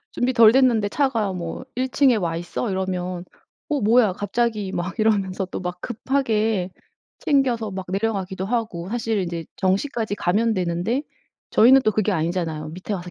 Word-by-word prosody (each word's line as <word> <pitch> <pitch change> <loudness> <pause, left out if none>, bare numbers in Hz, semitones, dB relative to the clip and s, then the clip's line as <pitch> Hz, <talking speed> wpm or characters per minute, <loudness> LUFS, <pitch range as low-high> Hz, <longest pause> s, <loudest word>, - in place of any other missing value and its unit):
준비 250 +1 0
덜 230 -3 +7
됐는데 235 -4 +3
차가 230 -6 0
뭐 170 -2 -5
"1 260 +1 0
층에 260 -2 +3
와 170 -4 -1
있어." 175 +6 -3
이러면 185 -1 -3 0.4
'어 295 -2 0
뭐야? 220 -2 +4
갑자기.' 210 -1 -1
막 180 +5 -4
이러면서 200 -3 +1
또 185 - -6
막 180 0 -5
급하게 225 -6 0 0.5
챙겨서 250 -6 +1
막 190 -1 -6
내려가기도 190 -1 -2
하고. 215 -6 -2
사실은 225 -2 -1
인제 170 -1 -5
정시까지 205 +3 -1
가면 215 +6 +1
되는데 180 +8 -1 0.5
저희는 260 +4 +6
또 215 - +3
그게 215 +1 +1
아니잖아요 160 -3 -2
밑에 185 +5 -6
와서 180 -2 -6
205 Hz, 335 characters per minute, -23 LUFS, 180-230 Hz, 0.5 s, 덜